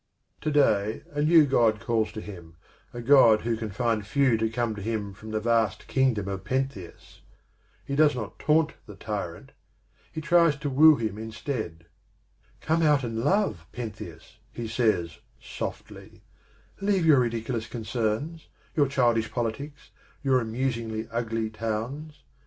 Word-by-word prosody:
To - - -1
day 110 -8 +2
a 145 0 -2
new 160 0 +6
God 115 -6 +2
calls 110 -1 0
to 110 - -6
him, 85 -6 -11 0.4
a 120 - -7
God 115 -4 +6
who 115 0 -1
can 110 -1 -5
find 110 +1 -1
few 130 +4 +2
to 110 0 0
come 115 0 -1
to 105 - -8
him 105 -2 -3
from 110 +3 -11
the 110 0 -1
vast 115 -1 +1
kingdom 125 -7 +1
of 95 -1 -4
Pentheus. 130 -9 -4 0.6
He 140 - -3
does 150 -1 +4
not 110 -5 -6
taunt 155 0 +2
the 105 - -10
tyrant; 100 -6 -5 0.6
he - - -5
tries 165 -1 +4
to 145 0 -4
woo 155 +3 +7
him 110 -4 -3
instead. 110 - -5 0.4
" 105 +3 -36
Come 160 +1 +1
out 150 -4 +3
and 115 -2 -3
love, 145 - +1
Pentheus," 110 -1 -8
he 115 -1 -5
says 110 - 0 0.2
softly; - - -8 0.6
"leave 195 -3 +1
your 150 -4 +6
ridiculous 115 -1 -2
concerns, 115 +7 -3 0.3
your 145 -3 +3
childish 120 -4 +1
politics, 130 +5 -4 0.3
your 130 -2 +3
amusingly 115 -1 -3
ugly 115 -1 -2
towns. 115 +8 -5
115 Hz, 150 wpm, -26 LUFS, 110-140 Hz, 0.6 s, woo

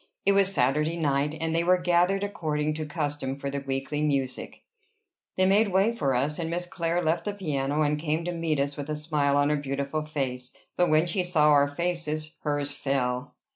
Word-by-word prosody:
It 200 - +5
was 195 -1 +4
Saturday 150 +2 +1
night, 145 -1 0
and 160 0 -1
they 165 +1 +2
were 180 +1 +4
gathered 180 +2 +2
according 155 -6 -1
to 155 0 -4
custom 145 -3 -3
for 140 0 -4
their 140 0 -3
weekly 135 +2 -3
music. 140 -4 -2 0.7
They 185 - +4
made 205 +3 +4
a - - -3
way 195 +4 +3
for 140 - 0
us; 145 +5 0
and 165 -1 -2
Miss 175 +1 -2
Clare 175 0 -1
left 160 +1 0
the 205 -1 -2
piano, 150 -5 -1
and 150 0 +1
came 160 +1 -1
to 175 - -1
meet 165 -3 -1
us 140 +1 -1
with 145 0 -6
a 150 - -1
smile 150 -2 +1
on 145 +1 +3
her 150 - +2
beautiful 140 +2 -2
face. 130 -4 -4 0.2
But, 180 - +2
when 155 +2 +4
she 180 +1 0
saw 155 -4 +4
our 145 -1 +5
faces, 155 -1 -2
hers 145 -1 -1
fell. 135 -2 -2
150 Hz, 210 wpm, -27 LUFS, 140-170 Hz, 0.7 s, It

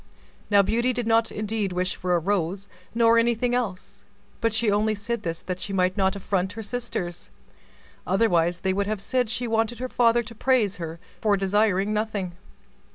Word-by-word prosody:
Now 200 -1 +6
Beauty 235 +5 +1
did 245 -1 -2
not 225 0 +3
indeed 210 -2 -2
wish 180 +1 -1
for 180 -1 0
a - - +3
rose, 190 +1 -1 0.3
nor 230 0 +5
anything 240 +1 +1
else, 200 -4 -3 0.4
but 230 -1 +2
she 220 0 +1
only 215 +1 +2
said 230 +2 -3
this 165 -3 -4
that 185 0 -4
she 195 - -4
might 185 -1 +2
not 190 -1 +1
affront 190 -1 -1
her 225 - -6
sisters; 205 -6 -4 0.8
otherwise 175 -3 +2
they 190 -1 +1
would 200 +1 -1
have 215 -1 -2
said 250 +3 0
she 235 +2 -2
wanted 225 +1 0
her 255 +1 -4
father 240 -1 +3
to 230 +1 -9
praise 230 -4 +1
her 165 -1 -6 0.2
for 210 -2 +3
desiring 200 +1 +2
nothing. 210 -4 -2
205 Hz, 180 wpm, -25 LUFS, 190-230 Hz, 0.8 s, Now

